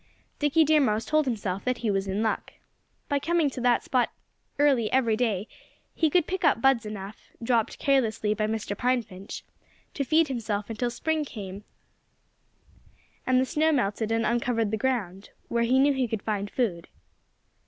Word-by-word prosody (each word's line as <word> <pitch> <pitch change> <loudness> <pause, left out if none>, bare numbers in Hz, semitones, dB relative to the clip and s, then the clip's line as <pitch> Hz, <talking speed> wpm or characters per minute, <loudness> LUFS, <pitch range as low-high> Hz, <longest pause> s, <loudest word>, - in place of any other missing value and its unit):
Dickie 295 +2 +4
Deer 310 0 +4
Mouse 220 -4 +1
told 310 -1 +2
himself 200 -5 -2
that 255 -1 0
he 215 - +2
was 195 0 -1
in 195 +3 -1
luck. 220 - -2 0.5
By 285 -1 +1
coming 325 -1 +1
to 250 - -6
that 245 -1 +3
spot 250 -2 +1 0.5
early 275 -7 +3
every 240 -4 +3
day 215 -3 -1 0.5
he 320 - +2
could 345 +1 +3
pick 375 0 -3
up - - +4
buds 245 -3 +3
enough 205 0 -8
dropped 230 -2 +1
carelessly 225 -6 +1
by 215 0 -1
Mr. 215 -2 -3
Pine 250 +2 +1
Finch 190 -1 -9 0.5
to 280 - -1
feed 315 +4 +3
himself 220 -5 -3
until 240 +2 -1
spring 315 +6 -1
came 200 -6 -8 1.6
and 255 0 +4
the 260 - +2
snow 310 +4 +2
melted 220 -5 0
and 225 0 +1
uncovered 235 -2 0
the - - +1
ground, 210 -6 -2 0.2
where 235 0 +1
he 255 +3 +3
knew 280 +2 +4
he 260 -2 0
could 220 -2 -4
find 205 -2 -2
food. 190 -10 -2
235 Hz, 175 wpm, -27 LUFS, 210-270 Hz, 1.6 s, Dickie